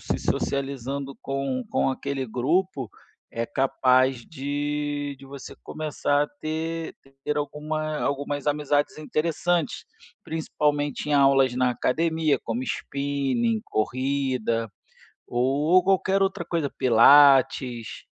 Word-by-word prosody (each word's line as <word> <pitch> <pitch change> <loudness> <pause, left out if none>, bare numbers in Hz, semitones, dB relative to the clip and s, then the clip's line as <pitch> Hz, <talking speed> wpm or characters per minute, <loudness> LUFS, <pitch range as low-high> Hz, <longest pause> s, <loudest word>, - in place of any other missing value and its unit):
se - - -2
socializando 140 0 -2
com 135 -2 -3
com - - +1
aquele 135 0 -3
grupo, 135 - 0 0.4
é 115 - -2
capaz 130 -1 +2
de 145 0 -3
de 135 - -13
você 135 0 -10
começar 150 -2 -1
a - - -11
ter 160 +1 -3 0.3
ter 150 0 -1
alguma 150 +1 -3
algumas 145 0 -2
amizades 145 0 0
interessantes, 165 +2 -1 0.4
principalmente 150 -2 -1
em 145 - +3
aulas 135 -2 +4
na 125 0 +2
academia, 155 +3 +1
como 115 +3 -2
spinning, 140 - -1
corrida, 130 -2 -1 0.6
ou 140 +9 +2
qualquer 195 0 +2
outra 190 -3 -1
coisa, 165 -4 -2
pilates, 130 -1 +4
140 Hz, 105 wpm, -25 LUFS, 130-155 Hz, 0.6 s, aulas